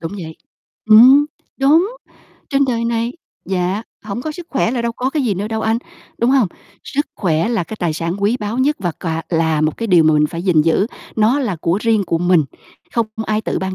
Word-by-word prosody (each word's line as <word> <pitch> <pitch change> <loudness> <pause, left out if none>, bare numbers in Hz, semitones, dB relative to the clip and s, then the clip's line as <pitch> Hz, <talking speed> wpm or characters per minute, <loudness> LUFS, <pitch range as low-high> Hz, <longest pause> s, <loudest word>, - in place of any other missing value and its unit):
Đúng 165 +3 -5
vậy. 165 -5 -7 0.5
Ừm, 260 +7 +8 0.3
đúng. 310 +8 +4 0.6
Trên 280 -1 +3
đời 235 -3 -1
này 235 +1 -1 0.3
dạ 190 +2 -1 0.2
hổng 215 +3 -5
có 310 - -4
sức 340 +2 -9
khỏe 265 -4 +1
là 245 -2 -2
đâu 235 0 -1
có 255 +3 -2
cái 300 -2 -1
gì 210 -5 +1
nữa 205 +3 -3
đâu 220 0 -2
anh, 225 +1 +1 0.4
đúng 235 +2 +2
hông? 260 -8 +3 0.4
Sức 290 +2 -2
khỏe 165 +1 0
là 225 -7 0
cái 220 - -8
tài 170 -3 0
sản 165 +2 -3
quý 215 +4 +2
báu 210 +4 -3
nhất 290 +3 +2
và 175 -4 -2
cà 165 -1 -2
là 160 -2 +1
một 155 0 0
cái 230 - -3
điều 175 -6 +5
mà 155 0 +4
mình 150 0 +3
phải 170 +3 -6
gìn 175 -5 +3
giữ, 165 +6 +2 0.3
nó 225 +6 +3
là 210 -10 -2
của 170 +4 0
riêng 225 -3 +2
của 165 - 0
mình, 175 -3 +3 0.5
không 230 -2 +1 0.2
ai 215 0 0
tự - - -2
ban 190 0 -3
215 Hz, 225 wpm, -18 LUFS, 170-240 Hz, 0.6 s, Ừm